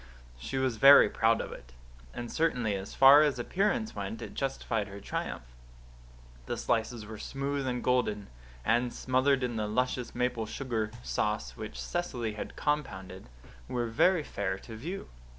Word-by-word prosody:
She 135 - -4
was 130 -3 0
very 140 +5 +9
proud 115 0 +2
of - - -6
it; - - -11 0.4
and 120 -1 -6
certainly 125 -10 +1
as 95 0 -5
far 135 +2 +9
as 145 -4 +2
appearance 210 - 0
went 225 - -4
it - - -8
justified 115 -5 -2
her 100 0 -9
triumph. 100 - -4 1.0
The - - -2
slices 115 0 -1
were 110 0 -8
smooth 140 0 -3
and 125 -1 -2
golden; 105 -5 +1 0.4
and, 120 +2 +2
smothered 130 +2 +1
in 120 -2 -2
the 105 -1 -1
luscious 125 +2 -1
maple 125 -2 -1
sugar 115 -3 -2
sauce 100 - -2
which - - -7
Cecily 125 -11 -3
had 105 - -7
compounded, 95 - -3 0.4
were 120 -1 -1
very 155 +9 +3
fair 95 -7 -3
to 110 +3 -10
view. 170 - -6
120 Hz, 155 wpm, -30 LUFS, 110-135 Hz, 1.0 s, very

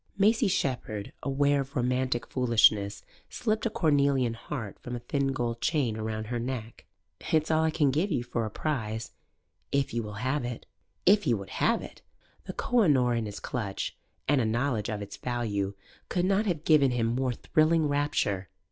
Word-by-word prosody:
Maisie 220 +3 +4
Shepherd, 125 - -2
aware 140 +1 +2
of 135 0 -8
romantic 125 0 0
foolishness, 110 -5 +3 0.3
slipped 220 -2 -1
a - - -1
cornelian 140 - +2
heart 115 -3 -6
from 125 - -6
a - - -4
thin 140 +3 -1
gold 120 -3 -2
chain 135 -9 +1
round 110 0 -3
her 120 +2 -3
neck. 120 -2 -5 0.5
"It's 155 0 +2
all 160 0 +3
I 160 - +3
can 150 -3 +2
give 165 +8 0
you 130 -6 0
for 120 -1 -2
a 110 - -2
prize, 110 -4 -3 0.6
if 140 -3 0
you 120 - 0
will 105 -1 -6
have 130 +6 -1
it." 120 -1 -5 0.4
If 205 0 +5
he 120 -5 +3
would 100 -2 -7
have - - +1
it? - - -11 0.4
The - - -5
Koh 245 -1 +2
i 200 - +4
Noor' 125 -5 +4
in 115 -2 -1
his 105 - -6
clutch 100 -6 -3 0.3
(and 140 -2 +3
a - - +2
knowledge 115 0 0
of 105 -2 -3
its 100 - -9
value) 105 -5 -2 0.3
could 180 -1 +1
not 200 +3 +2
have 165 -5 -1
given 150 -4 +5
him 125 -2 0
more 125 +2 0
thrilling 155 +5 +2
rapture. 145 -10 0
125 Hz, 185 wpm, -28 LUFS, 115-150 Hz, 0.6 s, If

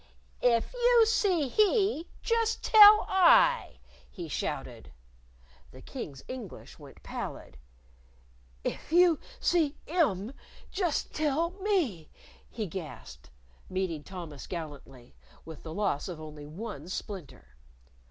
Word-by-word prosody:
"If 235 - +2
you 485 -2 +5
see 375 -9 +1
he, 400 - +2 0.2
just 455 -1 0
tell 425 -1 +8
I!" - - +4 0.3
he 175 -5 -8
shouted. 150 - -5 0.8
The 130 - -14
King's 150 - -8
English 250 -7 -9
went - - -14
pallid. 65 - -7 1.1
"If - - -5
you 345 -2 +5 0.2
see 315 -5 +1
'im, 255 - 0 0.4
just 360 -6 -1
tell 310 +3 0
me," 365 - -1 0.4
he 220 -2 -4
gasped, 110 - -9 0.4
meeting 185 -5 -2
Thomas 170 -6 -9
gallantly 145 -7 -8 0.3
with 160 -2 -10
the 160 - -8
loss 190 -6 -1
of 175 -4 -7
only 150 -1 -9
one 175 -1 -8
splinter. 165 - -7
230 Hz, 110 wpm, -29 LUFS, -, 1.1 s, tell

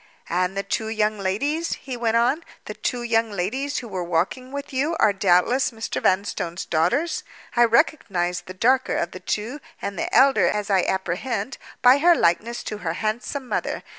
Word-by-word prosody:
"And 180 +2 0
the 195 - 0
two 220 - -2
young 215 -1 0
ladies," 285 - -1
he 260 -2 -6
went 230 -1 +1
on, 250 +8 +2 0.2
"the - - -5
two 245 -2 -3
young 230 -1 +1
ladies 250 +10 -2
who 245 - -4
were 185 -4 -4
walking 180 +10 -1
with 280 0 -6
you 295 +6 0
are 205 - +4
doubtless 195 +7 +3
Mr. 225 -2 -4
Vanstone's 185 -2 0
daughters? 245 - 0 0.3
I 240 0 +6
recognized 195 - +1
the 185 - -8
darker 255 +6 +2
of 170 - -1
the 185 - -8
two, 215 +9 -3 0.2
and 200 - -5
the - - -2
elder 265 -10 +5
as 210 +1 -1
I 190 -2 +4
apprehend, 200 +6 -2 0.2
by 250 +3 +7
her 345 +3 +6
likeness 230 - +1
to 210 - -5
her 165 - -2
handsome 230 +7 -3
mother. - - -2
220 Hz, 180 wpm, -23 LUFS, 190-260 Hz, 0.3 s, by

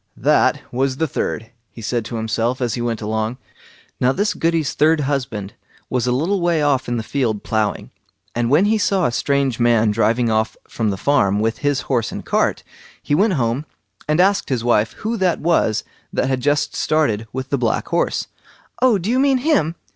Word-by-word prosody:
"That - - +2
was 130 +1 0
the 160 - 0
third", 115 -4 -3 0.2
he 115 - -11
said 115 +1 -1
to 115 - -6
himself, 115 +2 -1
as 120 -4 -1
he 120 - -3
went 115 -2 -2
along. 110 +3 -2 0.6
Now 125 - +3
this 205 +9 0
Goody's 165 -3 0
third 155 +1 +3
husband 125 -8 -3 0.4
was 125 -1 0
a - - +2
little 170 +10 0
way 170 -3 +2
off 140 -3 +1
in 120 0 -1
a - - -4
field 115 -4 -1
ploughing, 110 -2 -1 0.4
and 120 0 0
when 150 +9 +4
he 215 +1 +2
saw 195 -3 +2
a - - +1
strange 140 -1 0
man 115 -2 +3
driving 115 +2 +1
off 110 0 0
from 110 -2 -1
the 100 - -2
farm 100 -5 +2
with 110 +1 -1
his 145 -2 0
horse 120 -5 -1
and - - -7
cart, - - 0 0.4
he - - -1
went 195 +6 +3
home 120 -1 0 0.4
and 155 +2 +1
asked 195 +2 +3
his 125 -4 -1
wife 110 -2 +2
who 225 +2 -3
that 185 -3 +1
was 160 -10 +1 0.3
that - - 0
had 130 -1 -1
just 145 +1 +1
started 115 -9 0
with 130 +1 -5
the 140 - +2
black 115 -3 -1
horse. - - 0 0.6
"Oh, 250 -4 +5
do 185 +1 -5
you 250 +3 +2
mean 270 -1 +3
him?" 255 - +1
130 Hz, 200 wpm, -20 LUFS, 115-160 Hz, 0.6 s, Oh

